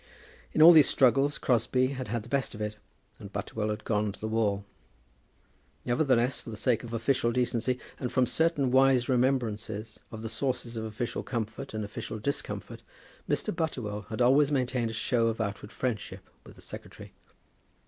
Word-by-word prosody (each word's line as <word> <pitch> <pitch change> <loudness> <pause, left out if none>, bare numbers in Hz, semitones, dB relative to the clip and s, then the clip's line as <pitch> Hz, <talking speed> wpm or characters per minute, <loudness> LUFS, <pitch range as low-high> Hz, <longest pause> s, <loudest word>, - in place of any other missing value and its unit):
In 155 - +5
all 170 - +11
these 155 -4 +7
struggles 135 +2 +3
Crosbie 125 +1 +2
had 130 -2 -5
had 115 +1 -2
the - - -13
best 135 -2 -1
of - - -9
it, 105 0 -3 0.4
and 100 - -10
Butterwell 105 +1 -3
had 105 +1 -3
gone 105 -1 0
to 100 - -14
the 110 - -3
wall. 105 -3 0 1.2
Nevertheless, 125 -1 +2
for - - -10
the 110 - -6
sake 120 +1 +1
of 120 - -8
official 115 +1 +1
decency, 125 0 0 0.2
and 125 - -3
from 130 -1 +3
certain 140 +1 +1
wise 130 -1 +4
remembrances 115 -4 -1
of 110 0 -7
the - - -3
sources 120 +1 -2
of 110 0 -3
official 115 +2 -3
comfort 115 +1 -5
and 110 -1 -2
official 105 +1 -6
discomfort, 140 +7 -4 0.5
Mr. - - -1
Butterwell 110 -11 -3
had 115 +2 0
always 140 +4 +5
maintained 125 -3 0
a - - -5
show 115 +1 +1
of 115 0 -1
outward 105 0 -4
friendship 120 -4 -4 0.2
with - - -13
the - - -14
secretary. - - -10
120 Hz, 175 wpm, -29 LUFS, 110-130 Hz, 1.2 s, all